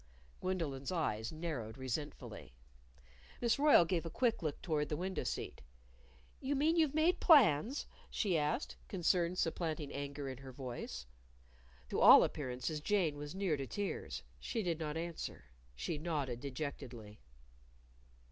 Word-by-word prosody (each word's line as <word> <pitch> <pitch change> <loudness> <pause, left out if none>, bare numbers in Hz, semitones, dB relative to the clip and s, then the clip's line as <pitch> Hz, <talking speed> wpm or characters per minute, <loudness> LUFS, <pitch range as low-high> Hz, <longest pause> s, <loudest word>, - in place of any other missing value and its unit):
Gwendolyn's 160 -7 -2
eyes 110 -11 -1
narrowed 155 -9 -4
resentfully. 130 - -5 0.8
Miss 235 +3 +2
Royle 290 - +7
gave 170 -1 0
a 165 - -4
quick 235 +6 +1
look 155 -3 -2
toward 150 -4 0
the 150 - -1
window 185 +2 -2
seat. - - -4 0.8
"You 280 +2 -1
mean 305 +4 +3
you've 310 -4 +3
made 335 +4 +3
plans?" 255 - +5 0.2
she 195 -6 0
asked, 150 -1 0
concern 175 -1 +1
supplanting 160 -4 -1
anger 140 0 -4
in 130 -1 -6
her 135 -1 -9
voice. 120 - -6 0.8
To - - -1
all - - +10
appearances 140 +2 -3
Jane 175 -4 +1
was 145 +3 -7
near 190 -5 +1
to 135 -1 -4
tears. 205 +6 -4 0.2
She 225 -3 -2
did 170 -3 -1
not 155 -1 -3
answer. 170 0 -5 0.3
She 150 - -3
nodded 145 -7 -2
dejectedly. 125 -6 -6
155 Hz, 140 wpm, -35 LUFS, 140-185 Hz, 0.8 s, all